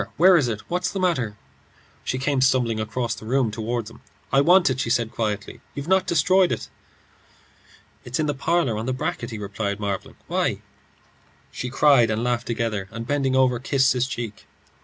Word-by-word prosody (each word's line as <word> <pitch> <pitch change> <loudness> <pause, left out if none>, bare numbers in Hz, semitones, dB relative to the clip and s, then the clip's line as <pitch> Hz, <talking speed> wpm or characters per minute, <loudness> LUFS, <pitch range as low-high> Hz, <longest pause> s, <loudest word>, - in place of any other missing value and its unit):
Where 180 +4 +7
is 145 -7 +3
it? 110 -3 -3
What's 180 +1 -1
the 195 - -3
matter?" 130 - 0 0.7
She 130 - -2
came 135 0 0
stumbling 125 -4 +2
across 110 +1 -2
the 110 - -9
room 125 -2 +1
toward 115 +1 -3
him. 115 - -13 0.3
"I 135 - +6
want 175 +4 +5
it," 130 - -3
she 120 - -1
said, 115 -2 +1
quietly. 105 -3 -3
"You've 140 +1 -5
not 190 0 +3
destroyed 180 +3 +3
it?" - - -3 1.3
"It's 125 +4 -4
in 155 - +1
the 145 - 0
parlour, 140 -5 0
on 115 - -4
the 130 - 0
bracket," 120 -2 -3
he 110 - -6
replied, 100 0 -3
marvelling. 100 -2 -4
"Why?" - - -1 0.9
She 125 - -5
cried 135 -3 +4
and 110 +2 -1
laughed 120 0 -1
together, 115 -4 -2
and 115 +1 -6
bending 135 0 0
over, 130 -2 +3
kissed 135 +1 +2
his 125 0 0
cheek. 115 -5 -6
125 Hz, 185 wpm, -23 LUFS, 110-140 Hz, 1.3 s, Where